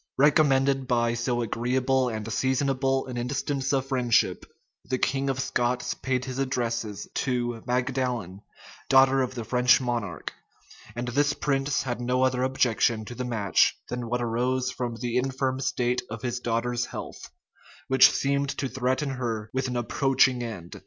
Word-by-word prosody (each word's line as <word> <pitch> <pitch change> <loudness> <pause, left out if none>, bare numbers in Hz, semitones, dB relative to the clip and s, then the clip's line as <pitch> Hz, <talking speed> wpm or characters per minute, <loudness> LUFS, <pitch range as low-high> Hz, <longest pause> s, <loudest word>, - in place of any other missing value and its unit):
Recommended 135 -2 +3
by 120 -1 +2
so 120 +1 -1
agreeable 125 +3 0
and 110 -2 -4
seasonable 135 0 +1
an 125 -2 -6
instance 135 +2 -2
of 135 -2 +1
friendship, 125 -4 +1 0.4
the 130 - -2
king 135 +1 0
of 135 -1 -1
Scots 125 -2 0
paid 130 -1 -2
his 130 0 -5
addresses 115 -6 -2
to 120 -3 -1
Magdalen, 125 -6 -1 0.5
daughter 135 0 +5
of 130 0 -2
the 120 - -4
French 125 +2 +4
monarch; 115 - -3 0.6
and 120 +1 -3
this 145 +3 +2
prince 135 -2 0
had 120 -2 -3
no 125 +1 +1
other 130 -1 +1
objection 120 -4 +1
to 120 - -7
the 125 - -4
match 105 -7 +2
than 125 -1 -4
what 120 0 -1
arose 125 +2 0
from 120 -2 -4
the 120 +1 -2
infirm 130 0 -1
state 125 -2 0
of 115 +2 -7
his 120 -1 -2
daughter's 120 +1 -1
health, - - -8 0.6
which 130 -1 +7
seemed 140 0 0
to 135 - -1
threaten 130 +3 -1
her 115 -5 -3
with 130 0 -1
an 125 -1 -2
approaching 130 +1 +2
end. 100 -8 -7
125 Hz, 155 wpm, -26 LUFS, 120-135 Hz, 0.6 s, which